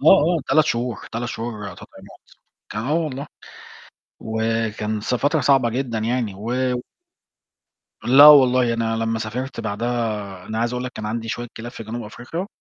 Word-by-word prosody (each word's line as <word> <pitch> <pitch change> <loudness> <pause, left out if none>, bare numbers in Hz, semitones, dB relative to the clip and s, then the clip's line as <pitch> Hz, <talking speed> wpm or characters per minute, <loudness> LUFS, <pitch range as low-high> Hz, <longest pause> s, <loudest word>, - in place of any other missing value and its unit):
يعني - - +6
آه، - - +4 0.2
آه، - - -5
3 155 -1 +5
شهور، 120 0 -1 0.2
3 120 +1 -3
تطعيمات 105 -6 -8 0.4
آه 115 +8 -1
والله. 140 -1 -5 0.9
وكان 110 -1 -1
س 115 - -1
فترة 145 +5 +1
صعبة 135 -2 +4
جدًا 120 -2 -2
يعني، 115 -2 -1
و 110 +5 -5 1.5
لا، 135 +4 +8
والله، 130 -4 +7
أنا 115 -1 -1
لمّا 115 0 -1
سافرت 120 +5 -4
بعدها 115 +3 -1 0.4
أنا 110 - -4
عايز 120 +1 0
أقول 125 - -3
لَك 125 - -5
كان 110 -3 -7
عندي 115 +1 -3
شوية 120 +1 -4
كلاب 120 +2 -7
في 115 - -8
جنوب 115 +2 -5
أفريقيا، 125 - -6
120 Hz, 155 wpm, -22 LUFS, 110-125 Hz, 1.5 s, لا